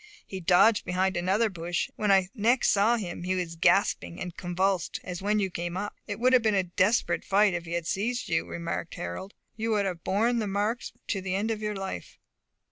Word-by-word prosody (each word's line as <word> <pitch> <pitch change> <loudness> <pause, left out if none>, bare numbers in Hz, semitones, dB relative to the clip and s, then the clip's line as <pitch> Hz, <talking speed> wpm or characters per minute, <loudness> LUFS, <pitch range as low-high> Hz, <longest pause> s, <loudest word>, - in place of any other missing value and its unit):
He 190 - -6
dodged 185 +5 +4
behind 185 +1 0
another 190 +6 +2
bush, 175 -3 -3
and - - -33
when 210 -1 +2
I 190 -2 +4
next 240 +2 +3
saw 215 +4 +3
him 180 -6 -5
he 185 +1 -1
was 175 -2 -3
gasping 175 0 +2
and 180 -2 -5
convulsed 185 0 -1
as 180 -1 -6
when 210 +2 +1
you 195 -3 0
came 175 +1 -4
up." 205 +2 -3
"It 205 0 -4
would 255 +2 +3
have 255 - +6
been 215 -2 +2
a 190 - +3
desperate 185 +5 +1
fight, 200 0 +3
if 175 -1 -3
he 170 - -6
had 170 -1 -2
seized 230 +8 -1
you," 165 -1 +1
remarked 170 0 -4
Harold; 90 - -6 0.2
"you 225 +1 -2
would 205 -2 +1
have 180 -4 -4
borne 230 +5 +1
the 215 - -1
marks 205 +5 -1 0.2
to 195 - -1
the 185 0 -2
end 210 +3 0
of 215 -1 -3
your 210 -1 -2
life." 190 - -6
195 Hz, 220 wpm, -28 LUFS, 175-210 Hz, 0.2 s, have